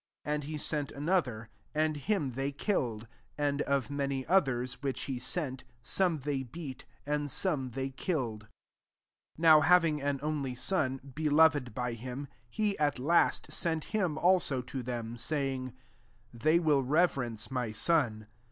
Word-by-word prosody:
5 150 - 0
And 150 0 -2
he 155 +1 -4
sent 150 -1 -1
another; 140 -8 0 0.3
and 155 0 +2
him 150 -2 0
they 135 +3 -2
killed; 125 - -1 0.3
and 145 0 0
of 140 -2 0
many 140 -2 -2
others, 135 -9 +1
which 135 -2 -2
he 130 -2 -3
aent^ 130 0 -2 0.2
some 175 +6 +1
they 140 -1 -1
beat, 130 +1 -8 0.2
and 145 0 -1
some 140 -4 0
they 135 +2 -3
killed. 130 - -2
6 - - -32 0.5
" - - -44
Now 160 -1 +7
having 165 -2 +4
an 140 -1 -1
only 145 -4 -2
son, 135 -3 0
beloved 150 -5 +3
[by 125 -1 -2
him,] 125 +4 -6 0.2
he, 210 - 0
at 145 -1 +2
last, 160 +7 +2
sent 160 -2 0
him 180 -8 +1
also 170 -8 +3
to 130 +1 -5
them, 120 -1 -5
saying, 135 -3 -2 0.3
* 115 +1 -34
They 155 +8 +3
will 155 -5 +3
reverence 135 -6 +1
my 125 -4 -1
son. 110 -4 +1
140 Hz, 155 wpm, -31 LUFS, 125-155 Hz, 0.5 s, Now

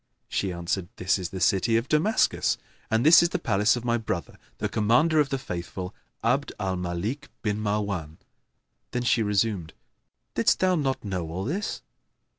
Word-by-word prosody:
She 95 - -1
answered, 85 +1 -2
"This 95 +2 +1
is 90 -2 -4
the 95 - -6
city 100 +5 +3
of 115 +3 -1
Damascus, 165 +9 +2 0.3
and 110 +3 +2
this 160 +2 +9
is 170 - +3
the - - -1
palace 105 +2 +2
of 120 -1 -5
my 120 -1 +2
brother, 95 -6 -4 0.2
the - - -1
Commander 125 +10 +3
of 145 -2 +3
the 135 - 0
Faithful, 90 -5 -5 0.3
Abd 130 +5 +1
al 95 -2 -1
Malik 90 +12 -3
bin 105 -1 0
Marwan.[FN#11]" 100 -7 -2 0.7
Then 125 - -2
she 120 -1 +3
resumed, 105 -5 0 0.6
"Didst - - +3
thou 185 0 +3
not 135 -8 -1
know 90 -5 -3
all 90 +4 -4
this?" 190 - -3
105 Hz, 170 wpm, -26 LUFS, 95-130 Hz, 0.7 s, this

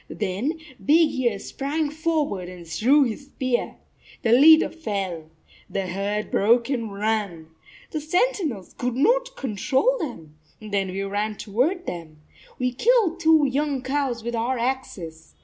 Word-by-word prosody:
Then 215 - -2 0.3
Big 315 +1 +5
Ear 240 -5 0
sprang 290 +8 -3
forward 305 - -1
and 180 -2 -10
threw 255 - +3
his 255 +3 -4
spear. 255 -3 -2 0.5
The 225 - +2
leader 315 +6 +7
fell. 195 - -4 0.4
The 195 - -2
herd 200 +3 -3
broke 235 +5 +3
and 230 -5 -2
ran. 200 -6 -2 0.4
The 310 - -3
sen 360 +11 +2
tinels 245 - -5
could 250 -1 -2
not - - +2
control 265 - 0
them. 160 - -7 0.2
Then 205 -3 -2
we 190 +1 -3
ran 205 +2 -2
toward 280 - -1
them. 165 -3 -7 0.4
We 250 0 0
killed 420 - +2
two 320 -3 +5
young 280 0 -1
cows 260 -4 -1
with 235 0 -3
our 240 +3 0
axes. 195 -11 -4
245 Hz, 145 wpm, -24 LUFS, 200-300 Hz, 0.5 s, leader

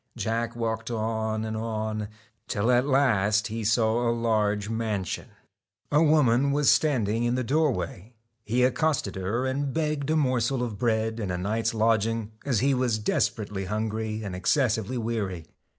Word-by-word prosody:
Jack 115 +1 -2
walked 110 -1 -2
on 110 -1 -2
and 110 0 -3
on, 110 -1 -3 0.4
till 110 +4 +1
at 125 +2 +3
last 110 -6 +2
he 110 +1 -4
saw 115 +2 +2
a - - +3
large 105 -3 0
mansion. 110 -5 -3 0.6
A 150 - +4
woman 140 -4 +4
was 145 0 +4
standing 115 -7 +1
in 120 +1 +1
the 130 - 0
doorway. 115 - -1 0.3
He 120 +3 +1
accosted 130 -4 +1
her 100 +7 -1
and 135 +1 -1
begged 150 -1 -1
a 160 - +2
morsel 130 -3 +1
6 120 -2 -2
of 105 - -10
bread 110 -1 0
and 100 -4 -2
a 90 - -2
night's 110 +5 -1
lodging, 115 0 +1
as 130 -7 0
he 135 +1 +3
was 125 -4 +1
desper 110 -1 0
.J^CK - - -16
ately 95 -1 -3
hungry 110 +1 -2
and 100 -3 -5
excessively 115 +3 +1
weary. 105 -8 -3
115 Hz, 165 wpm, -26 LUFS, 110-125 Hz, 0.6 s, A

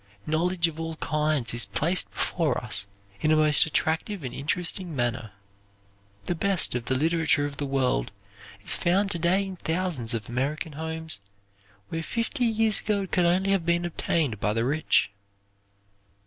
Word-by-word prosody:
Knowledge 170 +2 +1
of 160 -1 -7
all 165 0 -4
kinds 150 -5 0
is 115 -3 -2
placed 155 - 0
before - - 0
us 100 - -1 0.3
in 155 - +2
a - - +6
most 155 0 +5
attractive 160 +4 -1
and 125 -2 -4
interesting 170 +4 -1
manner. 120 -4 -2 0.9
The - - 0
best 190 +1 +2
of 120 -1 -3
the 130 - 0
literature 160 0 +2
of 145 -1 -6
the 145 - -2
world 130 - 0 0.5
is - - +3
found 195 +3 +1
to 170 - -2
day 185 +4 +2
in 190 -1 -7
thousands 160 -10 -2
of 110 -2 -4
American 140 +6 -2
homes 160 -2 -3 0.7
where 165 - -3
fifty 230 - -1
years 225 -2 +3
ago 205 -2 0
it 190 - -8
could 180 - +3
only 185 +3 +2
have 195 -3 +2
been 170 +1 +1
obtained 155 - -1
by 105 +1 0
the 115 +1 0
rich. 145 -5 +2
160 Hz, 165 wpm, -26 LUFS, 135-180 Hz, 0.9 s, a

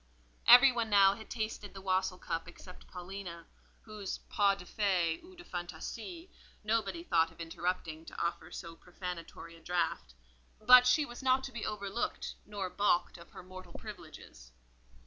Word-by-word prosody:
Every 250 +3 +10
one 235 -2 -1
now 195 -2 +6
had 220 +1 -11
tasted 215 -3 -4
the 195 - -8
wassail 185 -1 0
cup 165 -2 -4
except 180 +1 -13
Paulina, 180 -2 -8 0.4
whose 210 -3 -5
pas 200 -2 +3
de 180 - -10
fée, 180 - 0
ou 370 +1 -14
de 350 - -12
fantaisie, 220 - -6 0.4
nobody 210 -5 0
thought 165 -2 +2
of 165 - -21
interrupting 165 -1 -3
to - - -9
offer 170 - -2
so 165 -1 -7
profanatory 175 -2 -8
a - - -15
draught; 165 - -2 0.4
but 250 +3 +8
she 295 +4 +4
was 240 -1 -9
not 260 0 +3
to 270 - -5
be 235 -3 -4
overlooked, 200 +2 -3
nor 205 -2 -3
baulked 180 -2 +1
of 170 - -14
her - - -11
mortal 185 -1 -11
privileges. 155 - -11
190 Hz, 160 wpm, -32 LUFS, 170-220 Hz, 0.4 s, Every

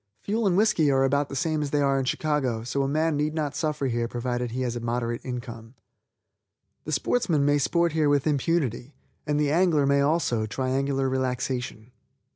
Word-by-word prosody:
Fuel 215 +1 0
and 180 -1 +2
whiskey 205 -8 +3
are 135 -1 +3
about 140 +1 +1
the - - -6
same 155 +2 0
that 145 - -2
they 145 - +1
are 140 -1 +2
in 135 - -1
Chicago, 130 -6 -1
so 130 +4 -2
a 135 - 0
man 155 +2 +1
need 150 +2 -1
not 150 -3 -2
suffer 150 -2 -1
here 120 -2 -1
provided 120 0 -3
he 125 +3 -4
has 120 -1 -2
a - - -3
moderate 120 0 -2
income. 120 -1 -7 1.1
The 155 - -4
sportsman 155 - +1
may 145 0 +3
sport 170 +4 +1
here 155 -1 +2
with 145 -2 +2
impunity, 145 -3 -1 0.3
and 150 0 +1
the 145 -1 +1
angler 165 -3 +3
may 140 0 +3
also 140 -7 +1
triangular 135 +3 -1
relaxation. 125 -2 -3
140 Hz, 190 wpm, -26 LUFS, 125-150 Hz, 1.1 s, whiskey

